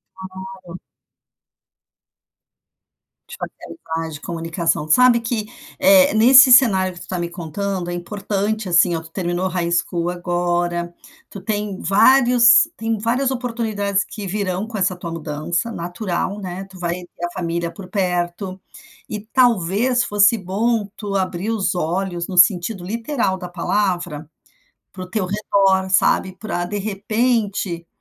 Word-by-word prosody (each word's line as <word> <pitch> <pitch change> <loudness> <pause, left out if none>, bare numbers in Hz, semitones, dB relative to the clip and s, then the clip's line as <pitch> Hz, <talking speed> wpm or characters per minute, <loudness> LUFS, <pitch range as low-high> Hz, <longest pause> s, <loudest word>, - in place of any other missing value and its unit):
É - - -20 0.5
claro. 175 0 -9 2.5
Tipo - - -9
aquele - - -9
plágio 160 0 -4
de 145 - -9
comunicação, 165 -2 -2
sabe 245 +8 +5
que, 225 -2 -3 0.3
eh, 285 0 +5
nesse 260 +4 +8
cenário 195 -8 +5
que 175 - -12
tu - - -8
está 185 - -5
me 170 0 -3
contando. 180 +2 -4
É - - -4
importante 205 +3 -3
assim 175 0 +4
ó, 165 - -3
tu 160 - -14
terminou 175 0 -2
o - - -3
High 175 -1 -2
School 170 0 0
agora, 175 -1 -2 0.4
tu 200 - -9
tem 205 -1 -3
vários 245 +5 +5
tem 225 0 -2
várias 240 +5 0
oportunidades 225 -6 -2
que 210 -2 -8
virão 190 0 -2
com 225 -1 -6
essa 185 -1 0
tua 175 -1 -7
mudança, 165 +6 -3
natural, 180 +2 -3
né. 185 -1 -6
Tu 190 -1 -14
vai 175 -1 -1 0.2
ter 175 - -3
a 175 - -5
família 170 -1 -2
por 185 +2 -11
perto 180 0 -2 0.5
e 210 - -4
talvez 235 +1 +2
fosse 205 +1 +4
bom 210 +3 -1
tu 205 -2 -6
abrir 185 +1 -2
os 210 -4 -1
olhos 175 +1 -2
no 185 - -5
sentido 180 +1 +4
literal 230 -1 -2
da 180 -1 -8
palavra 175 -4 -2 0.6
para 185 - -8
o 180 - -14
teu 190 -1 -1
redor, 195 -1 +1
sabe, 185 0 +2
pra 180 -5 -3
de 205 +4 -4
repente. 205 -3 -1
190 Hz, 150 wpm, -20 LUFS, 175-215 Hz, 2.5 s, nesse